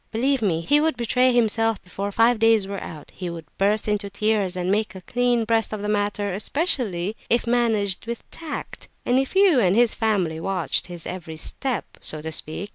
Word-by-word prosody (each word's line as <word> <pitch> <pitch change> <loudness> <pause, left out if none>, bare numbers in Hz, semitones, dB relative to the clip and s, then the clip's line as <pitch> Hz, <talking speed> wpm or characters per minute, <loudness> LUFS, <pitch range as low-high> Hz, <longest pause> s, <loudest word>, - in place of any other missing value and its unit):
Believe 260 +4 +1
me, 170 -6 +1
he 290 - +3
would 315 -3 +1
betray 250 +2 +2
himself 225 -2 +2
before 195 +3 -5
five 230 +2 +3
days 225 -2 +4
were 200 0 -5
out; 155 -3 -9
he 180 -2 -5
would 165 -1 -7
burst 210 +3 +2
into 210 -1 -1
tears, 200 -2 0
and 180 0 -1
make 210 0 0
a 190 - -8
clean 245 +2 +1
breast 225 -1 +1
of 210 -1 -4
the - - -2
matter; 205 -1 0
especially 215 - 0
if 235 +1 +2
managed 225 -5 +1
with 235 0 -6
tact, 315 -3 -7 0.2
and 250 +1 +3
if 270 +7 -2
you 380 -8 +5
and 190 -4 +3
his 235 -1 +4
family 190 -8 0
watched 180 -1 0
his 175 -2 -9
every 165 -3 -6
step, 245 +6 -3
so 155 - 0
to 160 +1 -5
speak. 160 +6 -2
210 Hz, 200 wpm, -23 LUFS, 185-240 Hz, 0.2 s, you